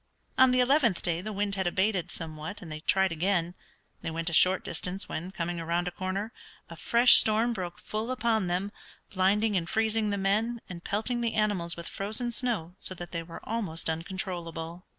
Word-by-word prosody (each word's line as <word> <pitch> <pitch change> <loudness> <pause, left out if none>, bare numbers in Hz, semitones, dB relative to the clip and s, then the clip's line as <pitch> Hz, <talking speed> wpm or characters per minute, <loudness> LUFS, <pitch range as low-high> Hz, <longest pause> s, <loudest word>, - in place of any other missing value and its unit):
On 260 0 +6
the 250 0 +3
eleventh 250 - +3
day 170 -1 0
the 215 +3 -5
wind 205 0 -1
had 190 -2 -1
abated 190 0 0
somewhat, 160 +4 -7
and 165 - -9
they 155 - -5
tried 190 +3 +2
again. 175 +1 0 0.5
They - - -3
went 165 +1 -2
a - - -5
short 185 +4 +5
distance 180 +1 -4
when, 170 +4 -5
coming 175 -2 -3
around 170 +2 -1
a - - -2
corner, 190 +5 -3 0.4
a - - -7
fresh 240 +1 +7
storm 225 +2 +3
broke 180 -4 -5
full 215 +2 -4
upon 230 -6 +1
them, 185 +3 -1 0.4
blinding 205 +3 +2
and 175 -2 -1
freezing 220 -1 +1
the 200 - -1
men, 215 +5 0
and 175 -2 -8
pelting 240 +4 -1
the 230 -1 -1
animals 200 -6 +1
with 170 - -7
frozen 220 +5 -1
snow 225 -9 -2
so 185 - -2
that 175 0 -8
they 170 - -3
were 165 0 -10
almost 190 -8 0
uncontrollable. 170 -1 -5
190 Hz, 190 wpm, -29 LUFS, 170-220 Hz, 0.5 s, fresh